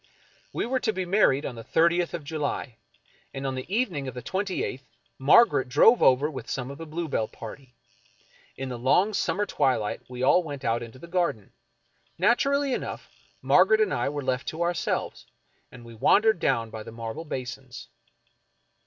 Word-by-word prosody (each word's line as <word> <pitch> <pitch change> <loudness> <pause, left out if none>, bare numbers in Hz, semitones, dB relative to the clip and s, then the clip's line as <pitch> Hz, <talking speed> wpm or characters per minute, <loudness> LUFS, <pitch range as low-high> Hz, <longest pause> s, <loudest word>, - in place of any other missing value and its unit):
We - - -2
were 260 +2 0
to 220 - 0
be 185 -2 -3
married 175 -7 +3
on 130 - -4
the 115 -1 -9
thirtieth 170 +4 +2
of 165 - -6
July, 145 -5 -4 0.6
and 135 0 -4
on 135 - -1
the 130 +7 -7
evening 190 - -1
of 130 - -6
the 125 - -7
twenty 190 - -2
eighth 130 0 -6 0.3
Margaret 135 - +5
drove 225 - +5
over 130 +3 +5
with 130 -6 -7
some 130 0 -3
of 140 - -10
the 165 - -7
Bluebell 155 -8 -2
party. 125 +2 -11 0.8
In 135 0 -4
the 125 -2 -5
long 180 - +3
summer 205 +1 0
twiHght 125 - 0
we 125 0 -5
all 180 - +5
went 145 -5 -7
out 115 +1 +1
into 115 +1 -9
the 150 - -11
garden. 170 - -2 0.6
Naturally 275 +8 +2
enough, - - -5 0.3
Mar - - +6
garet 465 -2 +3
and 430 - +1
I - - 0
were 145 0 -4
left 130 0 -2
to 165 +2 -2
ourselves, 175 0 -2 0.4
and 120 -2 -13
we 115 - -11
wandered 210 - +3
down 115 -7 0
by 110 - -7
the 110 - -9
marble 115 +6 -6
basins. 130 -3 -7
140 Hz, 180 wpm, -26 LUFS, 125-180 Hz, 0.8 s, Mar